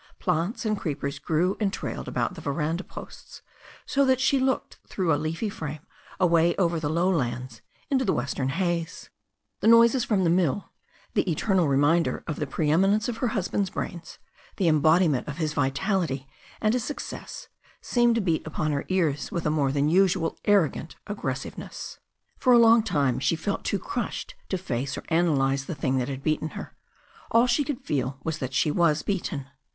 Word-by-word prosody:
Plants 205 +9 -1
and 215 -1 +1
creepers 140 -6 -4
grew 175 +4 +1
and 205 -3 +1
trailed - - -5
about - - -1
the - - -9
veranda 155 +5 -2
posts, - - -11 0.4
so 280 - +2
that 260 -1 +3
she 275 +1 +3
looked 260 -1 -1
through 180 -5 0
a - - +4
leafy 155 +8 -2
frame 155 -6 -6 0.3
away 170 -2 +4
over 170 -3 +1
the 150 -2 -2
low 170 +4 +1
lands 125 -8 -2 0.3
into 260 -1 +3
the - - +1
western 130 +1 -1
haze. 170 +1 -2 0.5
The - - 0
noises 230 +2 +6
from 205 -5 +1
the 170 - +3
mill, 180 +1 +1 0.4
the - - +1
eternal 180 +1 +2
reminder 145 +5 +2
of 155 - -4
the 150 - -2
preeminence 190 +10 +2
of 240 -2 -3
her 250 - 0
hus 210 -5 -1
band's 200 -2 0
brains, 170 -2 -6 0.4
the 185 - +1
embodiment 155 -2 +3
of 150 -1 -5
his 155 -3 -1
vitality 145 0 0 0.3
and 215 0 +2
his 250 -2 0
suc 295 - -5
cess, - - -7 0.3
seemed 240 -1 +2
to 230 - +1
beat 170 -5 +1
upon 155 0 -1
her 140 -1 -2
ears 160 -7 0
with 170 - -3
a 150 - +2
more 145 -3 +1
than 140 +1 +1
usual 180 0 +2
arrogant 175 -6 +2
aggressiveness. 205 -1 -5 0.4
For 255 - +4
a - - +8
long 230 0 +7
time 140 - 0
she 155 - +1
sat 160 - -12
feeling 200 - -1
too - - -1
crushed - - -4 0.2
to 190 - 0
face 135 -6 -3
or - - -6
analyze 140 -5 +2
the 170 - -5
thing 135 -1 0
that 125 +1 -2
had 135 0 -5
beaten 155 +1 0
her. - - -8 0.5
All 230 +2 +5
she 250 +4 +2
could 280 -3 -4
feel 135 -3 -2
was 160 -1 -3
that 130 -1 -4
she 150 - +2
was 165 -2 +2
beaten. 175 -8 -2
165 Hz, 190 wpm, -26 LUFS, 145-200 Hz, 0.5 s, a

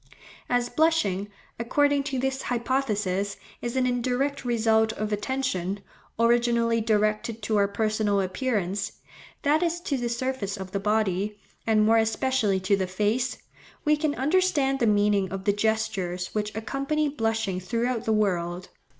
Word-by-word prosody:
As 245 -1 +2
blushing, 245 - +1 0.3
according 285 +4 +2
to 275 -2 -2
this 265 +1 -1
hypothesis, 210 -6 -1 0.2
is 240 +1 -3
an 260 -1 +2
indirect 255 +3 0
result 220 -2 +2
of 215 -1 -3
attention, 205 -5 -2 0.4
originally 235 0 +3
directed 215 +1 0
to 215 0 +1
our 200 -1 +4
personal 215 0 0
appearance, 200 -1 -1 0.5
that 300 +2 +3
is 345 0 0
to 285 -5 -1
the 240 -1 -2
surface 235 -4 -2
of 190 -1 -7
the 200 - -1
body, 210 -1 0 0.3
and 215 -1 +4
more 225 +1 +5
especially 225 -2 +1
to 185 +2 +3
the 190 -1 -1
face, 210 +7 0 0.5
we 300 0 +5
can 300 -1 -1
understand 285 -2 +2
the 235 - +2
meaning 205 -3 +2
of 195 0 -4
the 205 0 +2
gestures 205 -4 -1
which 210 0 -2
accompany 275 +7 -1
blushing 225 -8 -1
throughout 230 +5 -1
the 220 - +1
world. 180 -4 0
220 Hz, 145 wpm, -26 LUFS, 205-260 Hz, 0.5 s, more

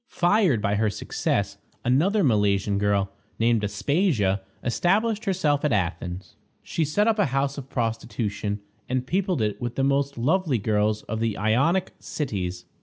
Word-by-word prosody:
Fired 175 - +2
by 100 0 +1
her 110 0 +2
success, 100 - -2 0.3
another 175 - +3
Milesian 105 - +2
girl, 100 -1 +1 0.3
named 115 -1 +2
Aspasia, 105 - +1 0.2
established 205 - +1
herself 160 -7 +1
at 150 - +2
Athens. 90 -2 -2 0.3
She 165 - -1
set 205 +9 +1
up 225 -1 +2
a 205 - +4
house 135 +1 0
of 135 -1 -10
prostitution, 110 -3 -2 0.3
and 130 0 -1
peopled 180 - 0
it 105 +2 -2
with 120 -1 -3
the 135 - 0
most 140 0 +1
lovely 150 +3 +1
girls 105 0 0
of 110 +1 -4
the 115 -2 -1
Ionic 140 - +2
cities. 95 - -4
120 Hz, 150 wpm, -25 LUFS, 105-155 Hz, 0.3 s, a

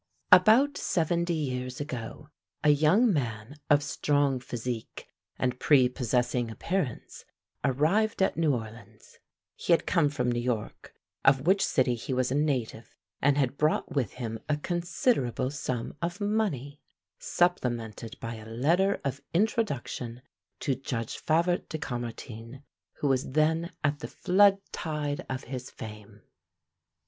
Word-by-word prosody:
About 220 +11 +6
seventy 170 0 0
years 130 -4 -3
ago 140 0 -6 0.3
a 150 - +5
young 160 - +4
man 120 -1 -3
of 145 0 +5
strong 145 -2 +1
physique 120 -2 -5 0.3
and 125 -1 -1
prepossessing 125 -3 +2
appearance 150 +2 -3 0.4
arrived 180 - +2
at 190 - +1
New 155 -5 +2
Orleans. 110 -2 -10 0.4
He - - +1
had 165 - +2
come 165 -5 +3
from 125 -4 -1
New 120 - 0
York, 120 -3 -4 0.3
of 135 0 +4
which 195 +3 +4
city 125 -2 +2
he 120 +3 -3
was 125 0 +1
a - - +1
native, 130 -7 -1 0.3
and 140 +1 +3
had 140 -1 0
brought 150 +1 +1
with 130 -8 -1
him 115 -3 -5
a 150 - +2
considerable 170 - 0
sum 130 -5 -4
of 175 +3 -3
money, 195 - -1 0.4
supplemented 120 -10 -1
by 115 0 -5
a 110 0 -11
letter 170 - +2
of 140 0 -2
introduction 140 - -1 0.4
to 140 - +1
Judge 120 -3 -4
Favart 170 +3 +1
de 160 - -3
Caumartin, 120 -1 -6 0.3
who 145 - -2
was 130 -1 0
then 160 +3 +2
at 145 0 +1
the - - -5
flood 195 +1 +4
tide 150 -3 -3
of 130 0 -3
his 130 0 -6
fame. 105 -2 -10
140 Hz, 135 wpm, -28 LUFS, 120-165 Hz, 0.4 s, About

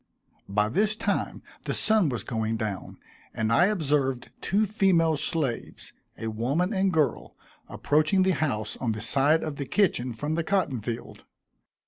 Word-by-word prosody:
By 105 +1 +2
this 210 - +1
time 205 -2 -2 0.2
the - - -2
sun 215 -7 +3
was 120 -6 -3
going 110 -1 -2
down, 105 -4 -5 0.4
and 110 0 0
I 175 +9 +5
observed 145 -9 0
two 205 +3 +1
female 185 -6 +2
slaves, 145 -5 -2 0.2
a 115 0 -4
woman 140 - 0
and 190 -1 +2
girl, 155 -4 0 0.3
approaching 155 +6 +2
the 190 - +3
house 135 -9 -1
on 115 -3 -1
the 110 - -5
side 140 +7 +3
of 155 -3 -4
the 140 - -4
kitchen 130 -11 +1
from 145 +7 -3
the 165 +1 0
cotton 160 - 0
field. 115 +2 -6
150 Hz, 155 wpm, -26 LUFS, 115-185 Hz, 0.4 s, I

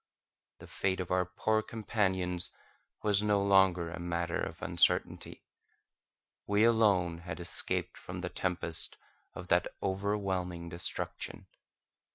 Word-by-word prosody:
The - - -12
fate 95 -1 -1
of 90 - -4
our 90 0 +2
poor 110 +4 +1
companions 95 -5 -1 0.5
was 105 -2 +3
no 105 -1 +2
longer 95 -4 +4
a 85 - -6
matter 85 0 -2
of - - -5
uncertainty. - - +1 1.0
We 105 +1 +3
alone 100 -7 +3
had 90 +2 -7
escaped 85 -1 -2
from - - -7
the - - -3
tempest 85 -3 0 0.4
of 90 0 -8
that 85 0 +3 0.2
overwhelming 95 -3 -1
destruction. 85 +1 -3
95 Hz, 120 wpm, -32 LUFS, 85-100 Hz, 1.0 s, longer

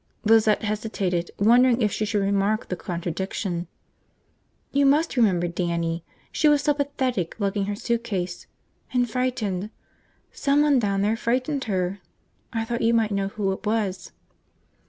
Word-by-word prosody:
Lizette 220 -1 +4
hesitated, 205 -5 -2
wondering 240 +4 +5
if 210 - +2
she 215 - -1
should 205 -1 0
remark 200 +2 0
the 180 - -1
contradiction. 175 +1 -3 1.0
"You 280 +1 +2
must 300 +3 +2
remember 190 -8 +3
Dannie. 170 -1 -2 0.3
She 310 - +2
was 295 -1 +4
so 295 - +3
pathetic, 260 - -2
lugging 200 -1 0
her 205 +1 -2
suitcase. 205 -6 -3 0.5
And 245 -1 +2
frightened. 220 -5 -2 0.6
Someone 285 -1 +3
down 200 -3 0
there 215 +2 +2
frightened 255 +5 -1
her. 190 -2 -1 0.5
I 225 -1 -2
thought 235 0 -3
you 230 +1 +3
might 220 -2 +2
know 200 -1 0
who 200 -1 -2
it 190 - -5
was." 210 -3 -1
215 Hz, 140 wpm, -24 LUFS, 190-245 Hz, 1.0 s, wondering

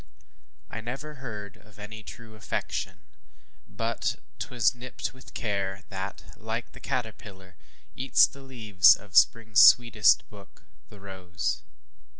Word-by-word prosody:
I 110 - -6
never 135 +4 -7
heard 105 -7 -7
Of 105 -2 -21
any 105 +1 -9
true 110 +1 -12
affection, 95 -3 -4 0.7
but - - -2 0.2
ŌĆśt - - -4
was 120 -3 +2
nipt 125 +1 -6
With 130 0 -16
care, 100 -3 -3
that, 95 0 -6
like 110 +1 -5
the - - -13
caterpillar, 110 -7 -6 0.4
eats 130 +2 +5
The 140 - -11
leaves 110 -8 +5
of 100 -1 -16
the - - 0
springŌĆÖs 110 -2 0
sweetest 115 +3 +6
book, 100 -2 -15 0.3
the 105 - -14
rose. 95 -3 -4
110 Hz, 135 wpm, -27 LUFS, 100-120 Hz, 0.7 s, sweetest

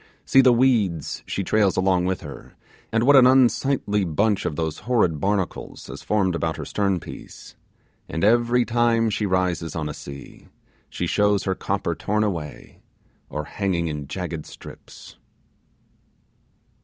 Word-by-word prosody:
See 135 - +5
the 130 -1 +5
weeds 115 - +1
she 100 - -2
trails 100 0 +2
along 95 -1 +2
with 95 0 -1
her, 70 -3 -11 0.4
and 115 0 +1
what 140 +3 +6
an 130 -2 +8
unsightly 130 -4 +2
bunch 100 +5 0
of 75 - -3
those 80 -1 -3
horrid 100 -9 +1
barnacles 95 +1 -2
has - - -9
formed 100 -4 0
about 80 -1 -2
her - - -6
stern 100 -3 0
piece; - - -11 0.5
and 80 - -3
every 120 +3 +3
time 115 -1 +2
she 105 0 -1
rises 90 -3 -1
on 80 -2 -2
a 75 - -5
sea, 70 -1 -11 0.4
she - - -3
shows 105 -1 +2
her 95 - 0
copper - - -2
torn 105 +1 -1
away, 85 -8 -5 0.5
or 75 - -4
hanging 85 -1 -2
in 75 -2 -5
jagged 85 -1 -5
strips. - - -13
95 Hz, 150 wpm, -23 LUFS, 85-115 Hz, 0.5 s, an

